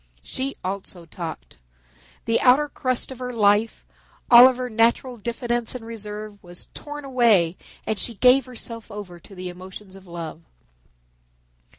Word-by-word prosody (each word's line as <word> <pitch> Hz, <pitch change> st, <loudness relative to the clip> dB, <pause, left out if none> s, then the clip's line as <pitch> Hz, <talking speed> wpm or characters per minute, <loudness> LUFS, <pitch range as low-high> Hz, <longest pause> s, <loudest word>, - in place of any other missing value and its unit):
She 270 Hz, +1 st, -3 dB
also 185 Hz, -2 st, -5 dB
talked. 165 Hz, -, -8 dB, 0.7 s
The 230 Hz, -, +2 dB
outer 270 Hz, +4 st, +5 dB
crust 255 Hz, -2 st, -1 dB
of 260 Hz, -, -9 dB
her 250 Hz, -1 st, -4 dB
life, 210 Hz, -1 st, +2 dB, 0.5 s
all 240 Hz, +1 st, +11 dB
of 260 Hz, -1 st, 0 dB
her 255 Hz, 0 st, -3 dB
natural 235 Hz, +2 st, +2 dB
diffidence 235 Hz, +2 st, -2 dB
and 235 Hz, -3 st, -7 dB
reserve, 210 Hz, -2 st, -7 dB
was 175 Hz, 0 st, -9 dB
torn 295 Hz, -1 st, -7 dB
away 225 Hz, -10 st, +3 dB, 0.3 s
and 215 Hz, -2 st, -1 dB
she 235 Hz, -, -2 dB
gave 250 Hz, +4 st, +5 dB
herself 230 Hz, -3 st, -8 dB
over 200 Hz, -5 st, -8 dB
to 195 Hz, -, -15 dB
the 180 Hz, 0 st, -6 dB
emotions 185 Hz, +2 st, -11 dB
of 190 Hz, -1 st, -14 dB
love. 170 Hz, -2 st, -7 dB
225 Hz, 150 wpm, -24 LUFS, 190-250 Hz, 0.7 s, all